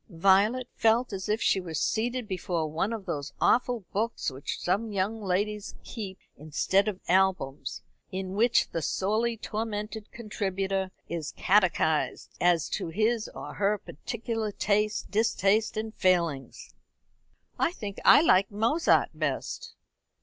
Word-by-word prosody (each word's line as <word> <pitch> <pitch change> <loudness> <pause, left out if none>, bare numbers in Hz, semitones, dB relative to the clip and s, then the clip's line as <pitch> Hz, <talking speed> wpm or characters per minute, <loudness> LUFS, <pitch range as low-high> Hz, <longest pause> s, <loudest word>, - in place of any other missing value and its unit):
Violet 200 +8 +3
felt 225 +1 +2
as 190 +1 -4
if 215 +2 +1
she 190 - +3
were 165 -3 -6
seated 235 - -1
before 180 -3 -2
one 165 +8 -1
of 220 -4 -5
those 145 0 -4
awful 245 -1 +2
books 220 -6 -1
which 135 +2 -5
some 205 +5 0
young 205 +3 -1
ladies 205 +2 -2
keep 200 -5 -6 0.2
instead 155 +7 +1
of 200 -3 -2
albums, 180 -7 +1 0.3
in 190 0 -4
which 230 +4 +3
the 165 - -2
sorely 220 +8 0
tormented 215 0 -4
contributor 195 -3 -2 0.2
is 165 -3 -4
catechised 180 -6 +2
as 175 -3 +3
to - - -2
his 215 +6 0
or - - -7
her 205 +1 +1
particular 225 - -4
tastes, 210 +1 +1
distastes, 215 0 +1
and 220 0 -3
failings. 175 - 0 0.9
"I - - +2
think 205 - -7
I - - +8
like 195 - +4
Mozart 230 +11 +2
best." - - -3
205 Hz, 135 wpm, -28 LUFS, 185-220 Hz, 0.9 s, I